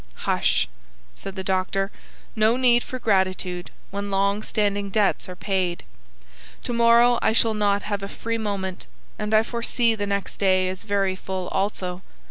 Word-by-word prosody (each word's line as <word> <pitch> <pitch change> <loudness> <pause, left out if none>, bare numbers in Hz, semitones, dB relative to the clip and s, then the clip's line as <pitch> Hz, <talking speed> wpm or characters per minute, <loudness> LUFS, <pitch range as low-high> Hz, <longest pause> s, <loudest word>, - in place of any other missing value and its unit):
"Hush," 65 - +2 0.5
said 195 - -8
the 190 - -4
doctor. 190 +1 0 0.4
"No 220 +2 +3
need 245 -2 +4
for 255 - -6
gratitude 185 -5 0 0.2
when 200 +1 -4
long 200 +1 +1
standing 205 -2 -1
debts 205 -2 +1
are 180 - -6
paid. 185 -2 -1 0.8
To 245 - -3
morrow 235 +1 +5
I 220 - +3
shall 225 0 +3
not 205 -1 +1
have 205 -1 -2
a 195 - -4
free 230 +3 -3
moment, 195 -3 -3 0.3
and 210 0 -2
I 215 0 +5
foresee 235 0 +1
the 205 -2 -3
next 200 -1 -2
day 185 -2 +3
as 185 0 -6
very 200 -2 +1
full 185 -1 -4
also. 190 -2 -2
200 Hz, 160 wpm, -24 LUFS, 190-220 Hz, 0.8 s, morrow